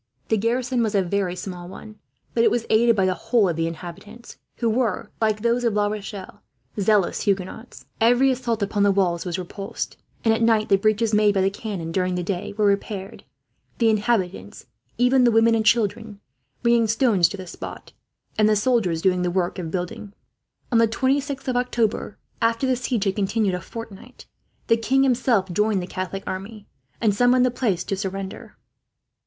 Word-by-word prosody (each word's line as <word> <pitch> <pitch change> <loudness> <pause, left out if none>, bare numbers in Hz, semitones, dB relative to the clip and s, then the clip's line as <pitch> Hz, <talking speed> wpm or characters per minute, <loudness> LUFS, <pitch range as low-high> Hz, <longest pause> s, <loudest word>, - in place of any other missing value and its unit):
The 220 - +3
garrison 245 +3 0
was 220 -2 0
a 195 - +3
very 185 0 -1
small 180 -2 -7
one, 215 +2 -11 0.3
but 230 - +2
it - - +5
was 235 -1 -1
aided 230 +1 +4
by 195 -2 +2
the 185 - +2
whole 225 +3 +1
of 170 - -1
the 165 0 0
inhabitants; 180 +8 -9 0.2
who 235 - -1
were, 225 -3 -1
like 215 -1 +1
those 235 +1 +1
of 230 -3 +1
La 205 0 +2
Rochelle, 205 -1 -6 0.4
zealous 200 -2 +2
Huguenots. 200 +3 -3
Every 245 +4 +4
assault 235 -4 -1
upon 205 +1 -1
the 200 0 +5
walls 180 -3 0
was 175 0 -2
repulsed, 190 +2 -6 0.3
and 225 - +5
at 225 - -1
night 225 -2 +3
the 195 - +5
breaches 215 +2 +1
made 210 -1 +4
by 190 - +3
the 195 +1 +2
cannon 195 -6 -5
during 185 +1 0
the 180 - -2
day 180 0 -3
were 210 - +2
repaired; 200 -1 -2 0.5
the 230 -2 +3
inhabitants, 210 -4 -1 0.3
even 250 +1 +4
the 245 - +5
women 225 0 +4
and 225 -1 +2
children, 220 -2 +1 0.4
bringing 235 -1 +3
stones 215 -6 +3
to 200 - -7
the 185 - -8
spot, 175 - -9 0.5
and 215 0 +5
the 215 - +4
soldiers 210 -7 +1
doing 180 -1 +2
the 180 - 0
work 180 0 -1
of 165 -3 -4
building. 200 +4 -5 0.6
On 230 - +4
the 230 - +5
26th 275 +4 -1
of 255 - 0
October, 235 -4 -1 0.2
after 230 +2 +1
the 260 -1 +2
siege 240 -3 -1
had 195 -2 0
continued 205 0 0
for - - 0
a - - -9
fortnight, 230 +4 -10 0.4
the 230 - +3
king 260 +5 +2
himself 240 -7 +2
joined 210 +1 +1
the 180 - -4
Catholic 185 +1 -5
army, 200 +3 -6 0.3
and 215 -3 +2
summoned 245 +4 +4
the 255 - +1
place 210 -8 -1
to 195 - -2
surrender. 195 0 -6
215 Hz, 190 wpm, -23 LUFS, 190-230 Hz, 0.6 s, it